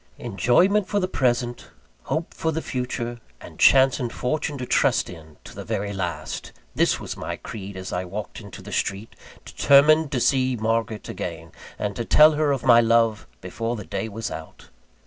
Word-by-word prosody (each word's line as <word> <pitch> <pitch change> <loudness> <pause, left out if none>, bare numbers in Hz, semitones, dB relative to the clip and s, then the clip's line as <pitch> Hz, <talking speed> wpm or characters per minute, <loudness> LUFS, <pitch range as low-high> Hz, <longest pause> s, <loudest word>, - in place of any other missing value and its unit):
Enjoyment 150 - +2
for 205 - 0
the 185 - 0
present, 120 -6 -1 0.4
hope 160 +1 -3
for 160 - -1
the 160 +1 -3
future, 120 -2 -4 0.2
and - - -13
chance 135 -1 +5
and 120 -2 -3
fortune 145 +2 -2
to 125 - -4
trust - - +2
in 80 -3 -13
to - - -12
the - - -7
very 100 +1 -3
last! 90 -3 -4 0.2
This - - +2
was - - -6
my - - -5
creed, 100 -3 -8
as 95 0 -6
I 90 +1 -2
walked 100 +5 -7
into 100 -4 -11
the - - -10
street, 100 +3 -3 0.3
determined 150 +2 +4
to 130 - 0
see 130 0 +2
Margaret 110 -1 -2
again, 85 -2 -6 0.3
and 105 -1 -3
to 120 - -3
tell 150 +6 +6
her 150 -1 +1
of 135 -2 -2
my 120 -2 +7
love 115 -1 +2
before 115 +6 -3
the 105 -4 -7
day 110 - -4
was 110 +1 -5
out. - - -10
120 Hz, 185 wpm, -24 LUFS, 105-135 Hz, 0.4 s, my